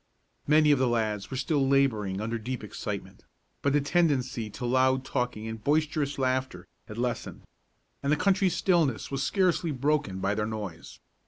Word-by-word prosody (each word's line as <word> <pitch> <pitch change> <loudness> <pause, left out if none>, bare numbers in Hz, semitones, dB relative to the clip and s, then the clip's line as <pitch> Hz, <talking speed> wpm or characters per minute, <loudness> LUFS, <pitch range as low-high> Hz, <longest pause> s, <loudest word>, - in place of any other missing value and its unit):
Many 150 0 +5
of 145 - +4
the 130 - +3
lads 110 -4 -1
were 130 - -4
still 140 0 +1
laboring 110 -8 +1
under 115 +1 -2
deep 125 +3 -5
excitement; - - -6 0.4
but 140 - +2
the 145 +1 +3
tendency 140 -8 +1
to 115 +4 -6
loud 130 +1 +2
talking 125 -4 -2
and 110 -1 -6
boisterous 150 -1 +1
laughter 130 -8 -1 0.2
had 105 - -9
lessened, 120 0 -3 0.6
and 140 - 0
the - - +5
country 195 +2 +2
stillness 165 - +1
was 135 -1 -2
scarcely 180 -1 +1
broken 140 -7 0
by 100 +1 0
their 105 0 -1
noise. 105 -6 -6
130 Hz, 165 wpm, -28 LUFS, 110-145 Hz, 0.6 s, Many